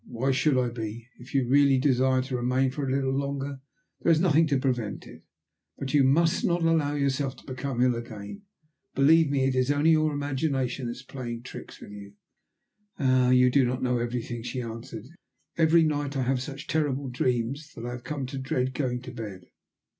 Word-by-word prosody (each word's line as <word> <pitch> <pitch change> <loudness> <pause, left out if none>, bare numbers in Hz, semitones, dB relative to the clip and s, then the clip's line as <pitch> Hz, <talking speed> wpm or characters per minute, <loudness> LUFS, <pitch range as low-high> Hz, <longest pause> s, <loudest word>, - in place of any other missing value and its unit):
"Why 125 +3 -1
should 135 +1 +2
I 125 -1 +1
be? 115 0 -6
If 125 +3 -11
you 135 -2 +3
really 140 +1 +5
desire 130 -1 +2
to 130 0 -4
remain 125 +2 +1
for 140 0 -3
a - - -1
little 135 0 0
longer 140 0 -3 0.4
there 170 - +3
is 160 - +4
nothing 165 -2 +4
to 140 -3 +1
prevent 125 -6 -2
it. - - -13 0.6
But 135 0 -5
you 145 -2 +5
must 160 +5 +3
not 175 -1 +1
allow 160 -3 +2
yourself 140 -1 0
to - - -18
become 130 -1 -2
ill 125 -1 +4
again. 115 - -7 0.5
Believe 155 +3 +5
me 140 -2 +1
it 135 0 +2
is 130 +1 +1
only 145 +3 +3
your 155 -1 +3
imagination 135 -3 -2
that 120 - -3
is 125 - -12
playing 120 -3 -6
tricks - - -10
with - - -11
you." 100 -1 -10 0.8
"Ah! 130 -3 +3
you 125 0 +5
do 140 +1 +4
not 125 +1 -1
know 125 -1 +1
everything," 120 0 -3
she 125 +2 -4
answered. 115 -1 -7 0.5
"Every 165 0 +4
night 145 -2 -1
I 130 - +1
have 125 0 0
such 140 +2 -7
terrible 145 -4 -1
dreams 125 +4 -1
that 115 - -7
I 120 - -4
have 120 0 -7
come 145 -2 -4
to 135 +1 -5
dread 130 -1 -1
going 125 -2 -2
to 125 - -8
bed." 105 -7 -8
130 Hz, 200 wpm, -27 LUFS, 125-145 Hz, 0.8 s, really